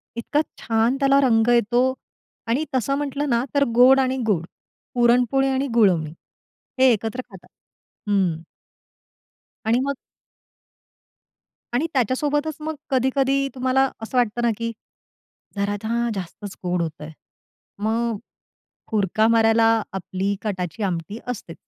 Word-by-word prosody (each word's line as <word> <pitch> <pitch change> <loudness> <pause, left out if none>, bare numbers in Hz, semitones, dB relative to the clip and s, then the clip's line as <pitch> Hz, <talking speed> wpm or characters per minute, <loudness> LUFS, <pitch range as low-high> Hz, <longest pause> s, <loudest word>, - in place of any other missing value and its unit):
इतका 260 +6 0 0.2
छान 230 +3 +1
त्याला 275 0 +4
रंग 225 -4 +3
येतो 240 +2 +3 0.5
आणि 255 +7 0
तसं 260 +2 +1
म्हटलं 290 0 -2
ना 235 0 +2
तर 280 - +4
गोड 255 +2 +7
आणि 260 0 +1
गुळ 195 -7 +2 0.5
पुरणपोळी 245 +3 +3
आणि 270 +1 0
गुळवणी 180 -9 +3 0.7
हे 260 -1 +6
एकत्र 225 +4 -3
खातात 190 -3 -15 0.6
हं. 185 -5 +1 1.2
आणि 230 +3 +3
मग 280 +1 -1 1.8
आणि 245 +6 +1
त्याच्यासोबतच 290 +5 0
मग 310 +1 -4 0.2
कधी-कधी 270 +1 +2
तुम्हाला 260 +1 +2
असं 225 +3 -4
वाटतं 240 -1 +1
ना 235 - +2
की, 230 0 -3 0.8
जरा 200 +1 -1
ना 235 +2 0
जास्तच 195 +2 -7
गोड 180 -1 0
होतय. 155 -2 -5 0.7
मग 225 +2 0 0.8
हुरका 215 +1 +2
मारायला 225 0 +4 0.2
आपली 195 +1 -2
कटाची 195 0 -4
आमटी 185 +2 -3
असते. 220 -9 -6
235 Hz, 120 wpm, -22 LUFS, 205-265 Hz, 1.8 s, गोड